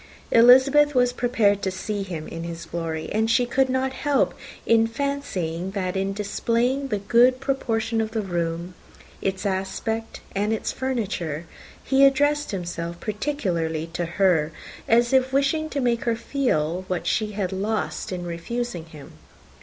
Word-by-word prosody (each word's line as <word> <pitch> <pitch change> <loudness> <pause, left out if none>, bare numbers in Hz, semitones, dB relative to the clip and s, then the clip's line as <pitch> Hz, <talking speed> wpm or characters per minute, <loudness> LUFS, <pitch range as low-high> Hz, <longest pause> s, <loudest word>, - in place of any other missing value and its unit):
Elizabeth 265 +5 +6
was 245 -1 +3
prepared 230 -5 +2
to 190 - 0
see 200 +2 -4
him 170 -5 -5
in 165 0 -6
his 170 0 -6
glory; 160 -2 -4
and 220 +1 +1
she 245 +2 +3
could 260 +2 +1
not 260 +1 0
help 290 0 +1 0.6
fancying 190 - -2
that 185 -1 -2
in 195 +1 0
displaying 235 +6 0
the 215 -6 -1
good 240 +5 +4
proportion 230 -4 -1
of 220 - -2
the 220 -1 -2
room, 170 -1 -3 0.5
its 195 0 -2
aspect, 200 +4 -3
and 205 +2 +1
its 220 - -2
furniture, 195 - -3 0.4
he 270 +1 +3
addressed 290 +2 +3
himself 170 -3 -4
particularly 185 - -2
to 175 +1 -1
her, 170 -3 +2 0.4
as 235 +2 +3
if 260 0 +3
wishing 280 +3 +1
to 285 - -2
make 240 -3 0
her 235 -1 +2
feel 185 - -1
what 180 -2 -2
she 215 -1 0
had 195 -3 -2
lost 205 +2 -2
in 180 -1 -4
refusing 175 +2 -4
him. 155 -4 -12
215 Hz, 150 wpm, -24 LUFS, 175-255 Hz, 0.6 s, Elizabeth